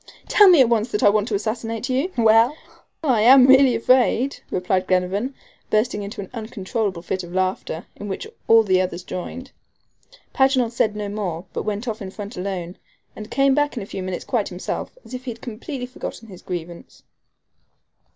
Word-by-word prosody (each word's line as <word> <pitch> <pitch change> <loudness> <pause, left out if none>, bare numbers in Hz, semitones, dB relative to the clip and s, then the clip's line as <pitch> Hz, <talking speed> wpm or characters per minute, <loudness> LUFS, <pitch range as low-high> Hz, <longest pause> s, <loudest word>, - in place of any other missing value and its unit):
"Tell 415 - +6
me 350 -6 +7
at 245 - +4
once 230 0 +1
that 210 - -1
I - - +7
want 210 +1 +1
to 215 - -1
assassinate 225 +2 -3
you?" 270 +8 0
"Well, 225 +4 +5 0.5
I 250 -8 +2
am 255 +3 +8
really 265 -1 +6
afraid," 255 +2 +2
replied 185 0 -1
Glenarvan, 190 +8 0 0.3
bursting 215 0 +1
into 200 0 -6
an 190 - -10
uncontrollable 215 -4 -3
fit 185 +1 -3
of 175 - -10
laughter, 185 -3 -2
in 205 - -8
which 195 - -4 0.2
all 225 -1 +6 0.2
others 180 -1 -4
joined. 250 +9 -7 0.8
Paganel 265 -3 +3
said 220 -3 0
no 210 -1 -4
more, 190 -4 -4
but - - -4
went 210 +3 -3
off 220 -2 -4
in 190 - -5
front 205 +3 -8
alone, 180 -1 -5 0.4
and 215 0 -9
came 275 0 +3
back 290 -1 0
in 225 - -3
a - - -8
few 195 - -6
minutes 185 -1 -5
quite 230 -6 0
himself, 180 - -5
as - - -12
if 255 0 -6
he - - -4
had 230 -1 -7
completely 250 +3 -6
forgotten 240 -2 -8
his 185 -3 -12
grievance. 175 -1 -8
215 Hz, 185 wpm, -22 LUFS, 190-250 Hz, 0.8 s, am